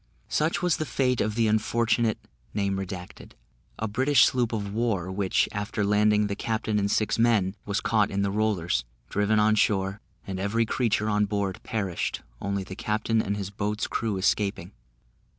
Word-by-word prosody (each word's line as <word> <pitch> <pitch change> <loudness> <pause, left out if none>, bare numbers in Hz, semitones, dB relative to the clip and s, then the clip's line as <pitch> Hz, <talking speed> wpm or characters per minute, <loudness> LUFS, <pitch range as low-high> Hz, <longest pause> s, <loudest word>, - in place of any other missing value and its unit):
Such 160 +3 0
was 180 -2 +2
the 155 - -2
fate 125 0 +1
of 105 0 -1
the 115 -1 +2
unfortunate, 115 +1 +1 0.4
a 95 - -5
British 130 +5 +4
sloop 125 -3 +1
of 100 -3 -3
war; 105 -5 -1
which, 95 0 +1
after 105 0 -2
landing 105 +1 +3
the 100 -1 -2
captain 110 -1 -1
and 100 0 0
six 105 +1 +1
men, 105 -5 +3
was 100 0 0
caught 110 -3 +2
in 100 0 -1
the 100 - 0
rollers, 100 - 0 0.3
driven 105 +1 +2
on 105 +1 +4
shore, 100 -1 +1 0.2
and 95 -1 -4
every 110 +4 +1
creature 110 -2 0
on 105 -1 +2
board 100 -2 -2
perished, 100 -6 -3 0.2
only 100 -1 -2
the 95 0 -8
captain 110 +1 0
and 100 0 -2
his 100 -1 -4
boat's 105 +1 -2
crew 110 -3 -2
escaping. 100 -1 0
105 Hz, 165 wpm, -26 LUFS, 100-110 Hz, 0.4 s, British